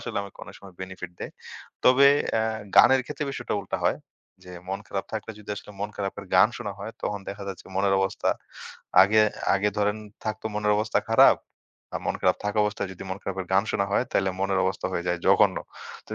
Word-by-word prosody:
আসলে - - -4
আমাকে 100 - -11
অনেক - - -12
সময় 95 -2 -13
বেনিফিট 95 -2 -7
দেয়। - - -6 0.5
তবে 130 +2 +7 0.3
অ্যা 110 - +2 0.3
গানের 130 +2 +8
ক্ষেত্রে 150 - -4
বিষয় - - -6 0.2
উল্টা - - -3
হয়। - - +3 0.5
যে 90 - -11 0.2
মন 95 - -2
খারাপ 95 - -3
থাকলে 110 0 -4
যদি 105 - -10
আসলে - - -10
মন 105 +1 -2
খারাপ 100 -1 -3
এর 100 - -12
গান 95 +4 +7
শোনা 100 - -4
হয়, 110 +3 -6
তখন 100 -1 -2
দেখা 100 0 -8
যাচ্ছে 95 - -8
মনের 95 0 +3
অবস্থা 95 0 -1 0.7
আগে 105 +3 +4 0.3
আগে 100 +2 +2
ধরেন 105 +1 +1 0.3
থাকতো 110 0 -3
মনের 105 0 +1
অবস্থা 110 +1 +1
খারাপ। - - +7 0.6
আর - - -2
মন - - 0
খারাপ 90 - +3
থাকা 105 +1 -1
অবস্থায় 105 -2 -2
যদি 90 - -10
মন 95 - -4
খারাপের 95 -1 -4
গান 95 +2 +4
শোনা 100 - +1
হয়, 125 - +2
তাইলে 95 -1 +2
মনের 95 -1 +1
অবস্থা 95 0 -1
হয়ে 85 0 -2
যায় 90 -1 0
জঘন্য। - - +5 0.5
তো - - -19
100 Hz, 205 wpm, -26 LUFS, 95-105 Hz, 0.7 s, গানের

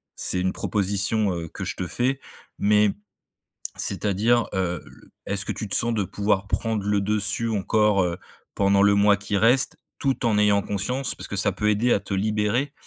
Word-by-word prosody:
c'est 90 - +1
une 95 0 -1
proposition, 105 0 +1
heu, 85 -1 -5
que - - -6
je - - -4
te 90 - -4
fais, 130 +8 -1 0.4
mais 105 0 +3 0.8
c'est-à-dire, 110 +4 +1
heu, 90 -3 -2
le - - -18
est-ce 100 +2 0
que - - -3
tu 110 - -5
te 95 - 0
sens 120 -1 +4
de 105 - 0
pouvoir 100 +1 -1
prendre 110 -1 -2
le 105 -1 +1
dessus 105 +3 0
encore, 105 -1 +1
heu, 85 -1 -2 0.4
pendant 100 0 +3
le 100 0 +4
mois 100 0 +4
qui 100 +1 -4
reste? 120 +5 +3 0.3
Tout 135 -3 -1
en 110 -3 +2
ayant 105 -1 +3
conscience 110 +7 -1
parce - - -7
que - - -6
ça 100 +1 +3
peut 105 +3 -1
aider 110 +4 +1
à - - +1
te 100 - -6
libérer, 105 +7 -1
105 Hz, 190 wpm, -23 LUFS, 100-110 Hz, 0.8 s, sens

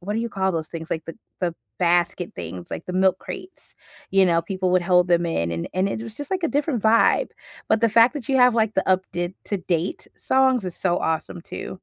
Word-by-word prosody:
what 205 +4 -4
do - - 0
you 235 - -2
call 190 -1 0
those 160 -1 -2
things? 165 -1 -7
Like, 160 -1 -2
the 165 - -8 0.2
the 175 -2 -1 0.2
basket 175 0 +1
things, 85 +1 -7
like, - - -5
the 180 - -4
milk 190 0 +3
crates. 370 0 -10 0.4
You 195 0 +4
know, 170 -1 +2
people 185 +1 -2
would 180 -1 +3
hold 180 0 +3
them 175 0 +3
in, 85 - -1
and 85 0 -3
and 185 +1 +1
it 220 - -4
was 225 -1 -8
just, 290 +3 -7
like, 375 -2 -1
a 325 - +2
different 280 -5 -1
vibe. 230 - +4 0.4
But 220 0 +3
the 230 - +5
fact 230 +4 +6
that 275 -4 -6
you 270 - +2
have, 250 -1 +6
like, 220 -1 +1
the 190 - 0
up 185 0 +4
did 175 +1 -3
to-date 180 -3 -2
songs 260 -4 +2
is 180 - -5
so 175 -2 +1
awesome 160 +1 -2
too. - - -7
185 Hz, 240 wpm, -23 LUFS, 175-230 Hz, 0.4 s, fact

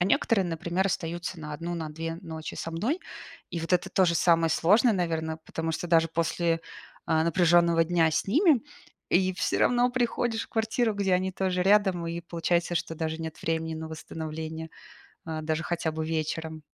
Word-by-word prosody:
а 175 - +3
некоторые, 195 +1 +2
например, 175 +3 -1
остаются 170 -1 -3
на 150 0 -6
1, 170 +3 -4
на 160 -2 -4
2 165 +1 -4
ночи 160 -3 -7
со 165 - -4
мной. 230 - -1 0.5
И 170 - -3
вот 165 +2 -4
это 180 - +2
тоже 180 -3 +3
самое 165 -1 +3
сложное, 215 +9 +4
наверно. 160 -3 -1
Потому 165 0 -3
что 175 - -3
даже 165 -1 +4
после, 165 0 0 0.5
а, 160 0 +2
напряженного 170 -1 +4
дня 165 -1 +3
с 155 - 0
ними, 290 - +4 0.5
и 185 +1 +3
всё - - 0
равно 245 0 +3
приходишь 240 -2 0
в - - -19
квартиру, 225 0 0
где 195 -2 +1
они 185 +1 0
тоже 185 -1 0
рядом, 190 -4 +3
и 170 +1 -3
получается, 170 +1 -1
что 165 - -2
даже 160 0 -3
нет 160 -1 -6
времени 160 0 -1
на 160 0 -6
восстановление, 160 0 -6 0.6
а, 160 -1 -4
даже 155 +1 -1
хотя 165 -2 -1
бы 160 0 -3
вечером. 160 0 -3
170 Hz, 180 wpm, -27 LUFS, 160-185 Hz, 0.6 s, сложное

